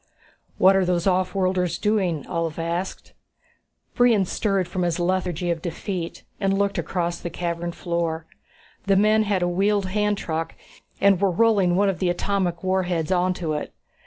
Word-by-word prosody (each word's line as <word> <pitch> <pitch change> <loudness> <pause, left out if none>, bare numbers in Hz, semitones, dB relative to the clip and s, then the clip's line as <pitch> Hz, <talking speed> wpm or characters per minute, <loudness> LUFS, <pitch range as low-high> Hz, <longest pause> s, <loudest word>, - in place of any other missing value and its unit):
"What 190 +1 +6
are 195 - +3
those 180 -1 0
offworlders 185 -2 +1
doing?" 190 -8 0
Ulv 165 -2 -3
asked. 170 +3 -4 0.8
Brion 235 -5 +4
stirred 195 -1 0
from 180 +1 -3
his 175 -2 0
lethargy 175 -1 0
of 165 -1 -3
defeat 175 0 -5 0.2
and 195 -1 +1
looked 200 -1 0
across 170 -2 -2
the 175 - -5
cavern 170 0 -3
floor. 170 -2 -2 0.6
The 195 - +4
men 215 +2 +4
had 200 -4 0
a - - +2
wheeled 195 +3 +1
handtruck 200 -5 -1 0.4
and 195 -2 +4
were 200 - +4
rolling 195 -2 +3
one 200 +2 +3
of 190 -5 -1
the 180 - +1
atomic 180 -1 -1
warheads 185 -3 0
onto 180 -3 0
it. 150 - -5
180 Hz, 155 wpm, -23 LUFS, 170-195 Hz, 0.8 s, What